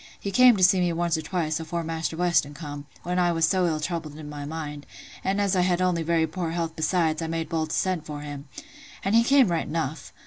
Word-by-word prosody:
He 200 Hz, -, -4 dB
came 250 Hz, +2 st, +6 dB
to 185 Hz, -, +1 dB
see 185 Hz, +1 st, +6 dB
me 175 Hz, -1 st, +2 dB
once 170 Hz, 0 st, 0 dB
or 160 Hz, -, -2 dB
twice, 155 Hz, -1 st, -2 dB
afore 170 Hz, +1 st, -3 dB
Maister 160 Hz, 0 st, -3 dB
Weston 170 Hz, -5 st, +1 dB
come, 145 Hz, -2 st, -7 dB, 0.2 s
when 180 Hz, +1 st, -1 dB
I 175 Hz, -1 st, +3 dB
was 165 Hz, -1 st, +2 dB
so 185 Hz, +1 st, +2 dB
ill 155 Hz, -2 st, 0 dB
troubled 155 Hz, -2 st, -4 dB
in 155 Hz, -1 st, -8 dB
my 145 Hz, -1 st, -6 dB
mind; 150 Hz, -1 st, -6 dB, 0.4 s
and 195 Hz, +2 st, 0 dB
as 200 Hz, -2 st, +2 dB
I 180 Hz, -, +3 dB
had 180 Hz, -1 st, +2 dB
only 180 Hz, -2 st, +1 dB
very 165 Hz, 0 st, +2 dB
poor 175 Hz, 0 st, -4 dB
health 165 Hz, -1 st, -3 dB
besides, 160 Hz, 0 st, +1 dB
I 165 Hz, -, -2 dB
made 165 Hz, -1 st, -3 dB
bold 160 Hz, -2 st, -1 dB
to -, -, -2 dB
send 185 Hz, -4 st, -1 dB
for 150 Hz, -1 st, -6 dB
him—and 145 Hz, +6 st, -7 dB
he 230 Hz, +1 st, +6 dB
came 265 Hz, -3 st, +5 dB
right 165 Hz, -1 st, -1 dB
enough. 155 Hz, -2 st, -3 dB
165 Hz, 240 wpm, -26 LUFS, 155-180 Hz, 0.4 s, came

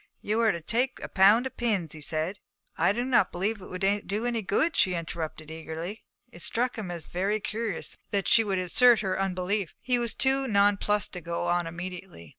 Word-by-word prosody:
'You 215 Hz, +2 st, -1 dB
are 225 Hz, -2 st, +4 dB
to 170 Hz, -, -5 dB
take 245 Hz, +9 st, 0 dB
a -, -, -3 dB
pound 205 Hz, +6 st, +5 dB
of 260 Hz, -, -6 dB
pins,' 205 Hz, -10 st, 0 dB
he 155 Hz, -, -10 dB
said. 160 Hz, +6 st, -3 dB, 0.4 s
'I -, -, +3 dB
do 240 Hz, +3 st, -1 dB
not 250 Hz, -7 st, +3 dB
believe 200 Hz, +4 st, -2 dB
it -, -, -9 dB
would 195 Hz, +2 st, 0 dB
do 210 Hz, +4 st, -2 dB
any 235 Hz, -2 st, 0 dB
good,' 285 Hz, -, +1 dB
she 185 Hz, -1 st, +3 dB
interrupted 160 Hz, -2 st, -5 dB
eagerly. 160 Hz, +6 st, -6 dB, 0.3 s
It 175 Hz, -, -11 dB
struck 245 Hz, +6 st, -1 dB
him 210 Hz, -5 st, -5 dB
as 170 Hz, -2 st, -5 dB
very 195 Hz, +4 st, -1 dB
curious 215 Hz, -3 st, -4 dB
that 200 Hz, -2 st, 0 dB
she 225 Hz, -, +6 dB
should 200 Hz, -4 st, -1 dB
assert 225 Hz, +6 st, +5 dB
her 190 Hz, -2 st, -1 dB
unbelief. 185 Hz, 0 st, -1 dB
He 250 Hz, -1 st, +1 dB
was 235 Hz, -2 st, -2 dB
too 270 Hz, 0 st, +2 dB
nonplussed 205 Hz, -1 st, +2 dB
to 180 Hz, -, -6 dB
go 170 Hz, 0 st, -3 dB
on 175 Hz, -1 st, +1 dB
immediately. 175 Hz, -, -8 dB
195 Hz, 205 wpm, -28 LUFS, 175-225 Hz, 0.4 s, she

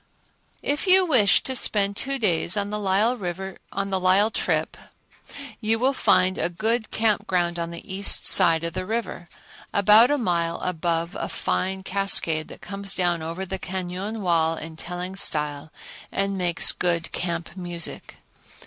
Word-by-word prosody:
If 290 Hz, +6 st, -1 dB
you 375 Hz, 0 st, +6 dB
wish 245 Hz, -, +4 dB
to 260 Hz, -, -1 dB
spend 200 Hz, -4 st, +2 dB
two 275 Hz, +5 st, -2 dB
days 185 Hz, -5 st, +1 dB
on 205 Hz, 0 st, -1 dB
the 210 Hz, -, -3 dB
Lyell 195 Hz, -1 st, 0 dB
trip -, -, -1 dB, 0.8 s
you 225 Hz, 0 st, 0 dB
will 260 Hz, +4 st, +1 dB
find 185 Hz, -7 st, +2 dB
a -, -, 0 dB
good 220 Hz, +5 st, -1 dB
camp 220 Hz, -2 st, 0 dB
ground 175 Hz, -2 st, 0 dB
on 170 Hz, 0 st, -2 dB
the 170 Hz, 0 st, -9 dB
east 195 Hz, +1 st, +1 dB
side 165 Hz, -2 st, +5 dB
of 170 Hz, -1 st, -2 dB
the 185 Hz, +1 st, -4 dB
river, 220 Hz, -6 st, -4 dB, 0.4 s
about 210 Hz, +4 st, +6 dB
a 290 Hz, -, +2 dB
mile 170 Hz, -7 st, -1 dB
above 170 Hz, 0 st, -2 dB
a -, -, -4 dB
fine 190 Hz, +1 st, -2 dB
cascade 185 Hz, -5 st, +2 dB
that -, -, -12 dB
comes 195 Hz, -1 st, -4 dB
down 175 Hz, -2 st, 0 dB
over 165 Hz, +4 st, -5 dB
the 190 Hz, +1 st, -5 dB
cañon 190 Hz, +4 st, -5 dB
wall 165 Hz, -3 st, +2 dB
in 160 Hz, +1 st, -8 dB
telling 180 Hz, +3 st, -6 dB
style 150 Hz, -4 st, -1 dB, 0.4 s
and 195 Hz, 0 st, -1 dB
makes 175 Hz, -3 st, +2 dB
good 170 Hz, -2 st, -2 dB
camp 170 Hz, -1 st, -4 dB
music. 175 Hz, -3 st, -4 dB
185 Hz, 150 wpm, -24 LUFS, 170-210 Hz, 0.8 s, you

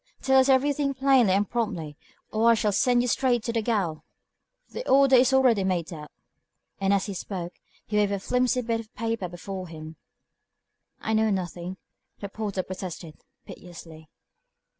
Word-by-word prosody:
"Tell 265 Hz, 0 st, +5 dB
us 260 Hz, +1 st, +3 dB
everything 275 Hz, +1 st, +2 dB
plainly 260 Hz, -7 st, +4 dB
and 200 Hz, +1 st, +1 dB
promptly, 175 Hz, -11 st, -3 dB, 0.4 s
or 225 Hz, +2 st, +3 dB
I -, -, +7 dB
shall 210 Hz, -1 st, 0 dB
send 245 Hz, +4 st, +2 dB
you -, -, -1 dB
straight 245 Hz, -1 st, +1 dB
to 230 Hz, -1 st, -1 dB
gaol. 200 Hz, -9 st, -1 dB, 0.7 s
The -, -, -6 dB
order 270 Hz, 0 st, +6 dB
is 255 Hz, +1 st, +5 dB
already 255 Hz, -6 st, +4 dB
made 180 Hz, -2 st, -1 dB
out;" 150 Hz, -2 st, -9 dB, 0.7 s
and 195 Hz, 0 st, +1 dB
as 200 Hz, -1 st, +2 dB
he 200 Hz, -, -5 dB
spoke, 180 Hz, -2 st, -6 dB, 0.3 s
he 210 Hz, -, -2 dB
waved 205 Hz, -1 st, +2 dB
a 200 Hz, -, -1 dB
flimsy 250 Hz, +4 st, 0 dB
bit 230 Hz, 0 st, -1 dB
of 225 Hz, 0 st, -12 dB
paper 225 Hz, -4 st, -2 dB
before 185 Hz, +1 st, -7 dB
him. 160 Hz, -1 st, -10 dB, 1.0 s
"I 220 Hz, -, -2 dB
know 220 Hz, 0 st, +2 dB
nothing," 180 Hz, -1 st, -4 dB, 0.4 s
the 200 Hz, -, -6 dB
porter 200 Hz, -2 st, -3 dB
protested, 180 Hz, -4 st, -8 dB, 0.2 s
piteously. 165 Hz, -3 st, -12 dB
210 Hz, 160 wpm, -26 LUFS, 180-245 Hz, 1.0 s, I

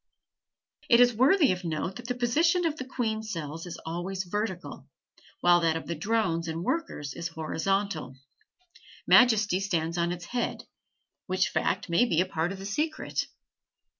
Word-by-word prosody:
It 235 Hz, -, +7 dB
is 245 Hz, 0 st, +6 dB
worthy 280 Hz, -, +4 dB
of 185 Hz, 0 st, -3 dB
note 170 Hz, +3 st, -3 dB
that 245 Hz, -, -9 dB
the 250 Hz, -, -2 dB
position 325 Hz, +9 st, +2 dB
of 315 Hz, -2 st, 0 dB
the 260 Hz, -, -5 dB
queen 225 Hz, -4 st, -2 dB
cells 165 Hz, -6 st, -6 dB
is 175 Hz, -, -6 dB
always 175 Hz, +3 st, -3 dB
vertical, 190 Hz, 0 st, -4 dB, 0.5 s
while 175 Hz, 0 st, +5 dB
that 165 Hz, -1 st, +1 dB
of 160 Hz, -, -7 dB
the 170 Hz, -, -3 dB
drones 170 Hz, -2 st, 0 dB
and 165 Hz, +1 st, -3 dB
workers 180 Hz, -, -2 dB
is 170 Hz, -, -4 dB
horizontal; 160 Hz, -2 st, -2 dB, 0.9 s
majesty 215 Hz, -6 st, +5 dB
stands 170 Hz, -3 st, -1 dB
on 170 Hz, 0 st, +1 dB
its 175 Hz, 0 st, -5 dB
head, 240 Hz, +5 st, -3 dB, 0.6 s
which -, -, +1 dB
fact -, -, -1 dB
may 170 Hz, +8 st, +3 dB
be 170 Hz, -9 st, +1 dB
a 180 Hz, -, +3 dB
part 175 Hz, -1 st, -2 dB
of 195 Hz, -, -6 dB
the 195 Hz, -, -8 dB
secret. 305 Hz, +10 st, -2 dB
190 Hz, 165 wpm, -28 LUFS, 170-240 Hz, 0.9 s, It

